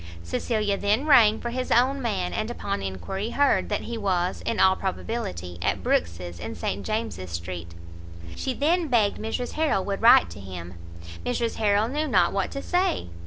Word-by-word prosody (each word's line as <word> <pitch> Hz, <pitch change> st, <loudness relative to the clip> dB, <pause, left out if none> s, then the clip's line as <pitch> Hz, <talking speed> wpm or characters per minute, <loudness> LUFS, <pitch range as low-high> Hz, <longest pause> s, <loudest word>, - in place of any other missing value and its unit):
Cecilia 205 Hz, -, -1 dB
then 210 Hz, +7 st, +1 dB
rang 225 Hz, -7 st, +6 dB
for 240 Hz, -, -4 dB
his 255 Hz, +1 st, -3 dB
own 265 Hz, +3 st, +3 dB
man, 195 Hz, -7 st, -1 dB
and 215 Hz, +1 st, -2 dB
upon 200 Hz, -4 st, -3 dB
enquiry, 145 Hz, -, -4 dB
heard 285 Hz, +3 st, +2 dB
that -, -, -1 dB
he 235 Hz, -1 st, -5 dB
was, 185 Hz, -3 st, 0 dB
in 230 Hz, -, 0 dB
all 190 Hz, 0 st, +5 dB
probability, 90 Hz, -, -4 dB
at -, -, -1 dB
Brookes's 85 Hz, +1 st, -1 dB
in -, -, -6 dB
St 100 Hz, +1 st, -3 dB
James's 215 Hz, -, -3 dB
Street. 85 Hz, 0 st, -6 dB, 0.6 s
She 260 Hz, -, -3 dB
then 330 Hz, +5 st, +1 dB
begged 225 Hz, -6 st, +2 dB
Mrs 225 Hz, +3 st, -3 dB
Harrel 305 Hz, -12 st, 0 dB
would 200 Hz, -1 st, -3 dB
write 155 Hz, -, +7 dB
to 85 Hz, -, -9 dB
him. 90 Hz, -2 st, -8 dB, 0.5 s
Mrs 240 Hz, -2 st, -1 dB
Harrel 210 Hz, 0 st, +2 dB
knew 300 Hz, +5 st, -1 dB
not 180 Hz, -9 st, +3 dB
what 195 Hz, -2 st, 0 dB
to 275 Hz, -, -6 dB
say. 360 Hz, -, 0 dB
205 Hz, 175 wpm, -25 LUFS, -, 0.6 s, write